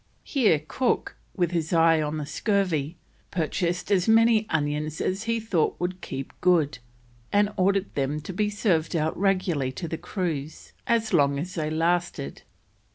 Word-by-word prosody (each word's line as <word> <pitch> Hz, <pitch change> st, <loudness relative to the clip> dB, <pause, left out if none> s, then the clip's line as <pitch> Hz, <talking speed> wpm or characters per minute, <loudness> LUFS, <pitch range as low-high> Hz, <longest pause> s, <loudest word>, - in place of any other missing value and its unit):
Here 225 Hz, -, +3 dB
Cook, 255 Hz, -2 st, 0 dB, 0.2 s
with 175 Hz, -3 st, +1 dB
his 165 Hz, -2 st, -1 dB
eye 165 Hz, -1 st, +5 dB
on 150 Hz, +1 st, -2 dB
the 150 Hz, -, -3 dB
scurvy, 170 Hz, -5 st, 0 dB, 0.3 s
purchased 175 Hz, +2 st, -1 dB
as 185 Hz, -3 st, +3 dB
many 225 Hz, -1 st, +5 dB
onions 150 Hz, 0 st, -1 dB
as 195 Hz, +4 st, -1 dB
he 230 Hz, 0 st, 0 dB
thought 200 Hz, -8 st, 0 dB
would 180 Hz, +1 st, -3 dB
keep 135 Hz, 0 st, -6 dB
good, 165 Hz, -7 st, +3 dB, 0.5 s
and 205 Hz, 0 st, +2 dB
ordered 195 Hz, 0 st, +1 dB
them 140 Hz, +2 st, -1 dB
to 185 Hz, -, -7 dB
be 210 Hz, +3 st, 0 dB
served 185 Hz, -7 st, 0 dB
out 160 Hz, 0 st, 0 dB
regularly 185 Hz, -8 st, +1 dB
to 170 Hz, -, -5 dB
the 160 Hz, 0 st, -4 dB
crews 160 Hz, -6 st, -4 dB
as 225 Hz, -2 st, +1 dB
long 140 Hz, -4 st, +3 dB
as 175 Hz, +6 st, -4 dB
they 155 Hz, -3 st, -2 dB
lasted. 165 Hz, -, -1 dB
175 Hz, 160 wpm, -26 LUFS, 155-200 Hz, 0.5 s, eye